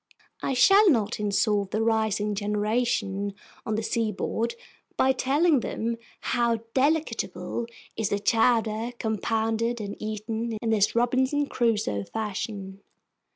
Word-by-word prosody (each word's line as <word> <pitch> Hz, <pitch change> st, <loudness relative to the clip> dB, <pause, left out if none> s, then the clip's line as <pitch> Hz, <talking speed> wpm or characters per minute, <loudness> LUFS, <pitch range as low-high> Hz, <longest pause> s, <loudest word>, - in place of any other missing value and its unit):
I 270 Hz, -, -1 dB
shall 390 Hz, -, +6 dB
not 225 Hz, -7 st, +1 dB
insult 205 Hz, -1 st, +1 dB
the 215 Hz, +2 st, 0 dB
rising 220 Hz, -2 st, +1 dB
generation 205 Hz, -1 st, -1 dB, 0.3 s
on 220 Hz, -, 0 dB
the 220 Hz, -, -1 dB
seaboard 225 Hz, +1 st, -1 dB, 0.4 s
by 265 Hz, -, +4 dB
telling 285 Hz, +4 st, +3 dB
them 230 Hz, 0 st, -3 dB, 0.2 s
how 235 Hz, -2 st, +1 dB
delectable 285 Hz, -4 st, 0 dB, 0.3 s
is 215 Hz, -2 st, -1 dB
a 205 Hz, -, +2 dB
chowder 225 Hz, +1 st, +2 dB
compounded 225 Hz, +1 st, -1 dB
and 205 Hz, -1 st, -5 dB
eaten 220 Hz, +2 st, -3 dB
in 225 Hz, 0 st, -1 dB
this 210 Hz, -1 st, +2 dB
Robinson 260 Hz, +4 st, +2 dB
Crusoe 220 Hz, -, 0 dB
fashion. 200 Hz, -, -5 dB
225 Hz, 115 wpm, -26 LUFS, 210-240 Hz, 0.4 s, shall